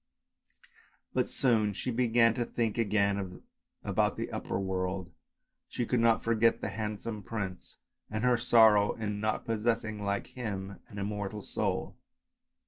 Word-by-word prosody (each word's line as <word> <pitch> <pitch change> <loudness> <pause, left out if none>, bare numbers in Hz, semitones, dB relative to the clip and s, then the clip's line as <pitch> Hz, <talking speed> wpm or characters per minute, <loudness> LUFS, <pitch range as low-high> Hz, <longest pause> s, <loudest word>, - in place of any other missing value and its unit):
But - - +1
she - - -5
soon 110 -5 +2 0.2
began 115 -2 +4
to 120 - -1
think 115 -1 -1
again 100 -4 0 0.4
about - - +1
the - - -3
upper - - -3
world, 95 -1 -2 0.6
she 120 - -2
could 125 +1 +1
not 115 -1 +3
forget 115 0 +3
the - - -3
handsome 105 0 -4
prince 100 -3 -5 0.3
and 110 +1 -3
her 125 -1 +4
sorrow 110 -3 +5
in 105 -2 -3
not 110 +1 -1
possessing, 110 -1 -1
like 100 0 -1
him, 100 -5 -5
an 105 - -11
immortal 100 0 -3
soul. - - -2
105 Hz, 135 wpm, -30 LUFS, 100-115 Hz, 0.6 s, sorrow